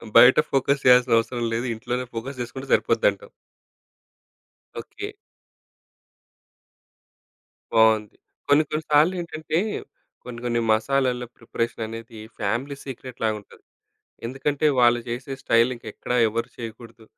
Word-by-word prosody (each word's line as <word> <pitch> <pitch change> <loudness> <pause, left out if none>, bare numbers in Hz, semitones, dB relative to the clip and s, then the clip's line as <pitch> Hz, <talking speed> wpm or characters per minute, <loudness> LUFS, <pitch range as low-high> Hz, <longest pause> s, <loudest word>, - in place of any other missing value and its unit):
బయట 125 +2 +8
ఫోకస్ 135 +1 +1
చేయాల్సిన 125 -2 +6
అవసరం 120 +1 -1
లేదు, 120 +2 -2
ఇంట్లోనే 125 +3 -3
ఫోకస్ 125 +4 -6
చేసుకుంటే 130 +3 -6
సరిపోద్ది - - +3
అంటావు. - - -13 1.5
ఓకే. 410 0 -8 2.6
బావుంది. 110 -2 +4 0.3
కొన్ని, 145 +2 +5
కొన్ని 155 0 -2
సార్లేంటంటే 160 0 +2 0.7
కొన్ని, 120 -1 -8
కొన్ని 120 -1 0
మసాలాల 125 +1 +1
ప్రిపరేషననేది 115 -1 -5 0.2
ఫ్యామిలీ 120 +7 -2
సీక్రెట్‌లాగుంటది. 115 -5 -5 0.6
ఎందుకంటే, 140 +4 -1
వాళ్ళు 120 0 +5
జేసే 125 +3 -4
స్టైల్ 115 +2 +4
ఇంకెక్కడ 120 +1 -7 0.2
ఎవరు 115 +2 -3
చేయకూడదు. 115 0 -9
125 Hz, 100 wpm, -24 LUFS, 115-135 Hz, 2.6 s, బయట